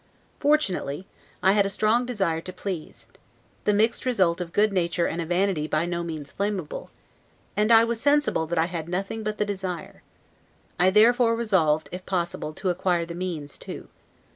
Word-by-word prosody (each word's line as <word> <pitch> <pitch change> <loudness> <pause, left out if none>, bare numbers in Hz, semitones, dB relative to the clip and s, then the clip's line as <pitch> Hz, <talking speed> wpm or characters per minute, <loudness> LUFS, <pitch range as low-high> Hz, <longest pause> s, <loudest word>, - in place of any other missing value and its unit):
Fortunately, 195 - +1 0.4
I 190 - +6
had 200 0 +4
a 195 - -1
strong 215 +4 +2
desire 190 -9 0
to 185 - -7
please 185 -4 -6 0.6
(the - - +4
mixed 220 +3 +2
result 185 -9 +2
of 170 -1 -5
good 210 +2 +2
nature 170 -2 +1
and 170 - -2
a 165 - -4
vanity 175 -3 +1
by 155 +2 0
no 175 0 -2
means 155 -4 -6
blamable), 200 -6 -3 0.7
and 210 +1 +2 0.2
was 230 -1 -2
sensible 290 - +2
that 170 +1 -2
I 160 - +4
had 170 -2 -5
nothing 195 +5 -3
but 215 0 -3
the 210 - +1
desire. 190 -4 -5 0.8
I 180 +1 +5
therefore 230 +3 +5
resolved, 170 -9 +2
if 180 +1 -6
possible, 175 -3 -2
to 185 +3 -1
acquire 175 -1 0
the 170 - -7
means, 170 -5 -5
too. - - -8
185 Hz, 170 wpm, -25 LUFS, 170-210 Hz, 0.8 s, I